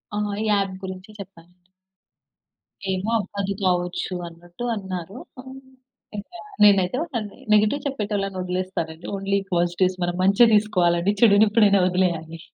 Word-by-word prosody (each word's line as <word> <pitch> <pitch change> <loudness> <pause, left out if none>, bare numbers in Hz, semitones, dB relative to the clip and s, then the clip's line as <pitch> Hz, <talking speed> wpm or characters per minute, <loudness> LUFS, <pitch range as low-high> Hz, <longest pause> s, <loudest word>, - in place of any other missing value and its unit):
ఆ! - - -2 0.2
ఈ - - -1
యాప్ 195 -2 +1
గురించి 185 +1 -7
చెప్పానండి. 180 -2 -14 1.2
ఏమో 190 +3 -2
అవ్వదు 200 -1 -3
కావచ్చు 180 0 -1
అన్నట్టు 175 +5 -11
అన్నారు. 190 0 -6 0.2
ఆహ్, 260 - -12 0.7
ఇంకా 280 - -9 0.2
నేనైతే 195 +2 +4 0.6
నెగెటివ్ 215 +7 +3
చెప్పేటోళ్ళనొదిలేస్తానండి. 185 - -3
ఓన్లీ 195 0 0
పాజిటివ్స్ 175 +2 +1
మనం 175 0 -1
మంచే 200 +5 +5
తీసుకోవాలి 185 -3 +2
చెడునెప్పుడైనా 205 -2 +5
వదిలేయాలి. 170 -3 -1
190 Hz, 105 wpm, -23 LUFS, 180-205 Hz, 1.2 s, మంచే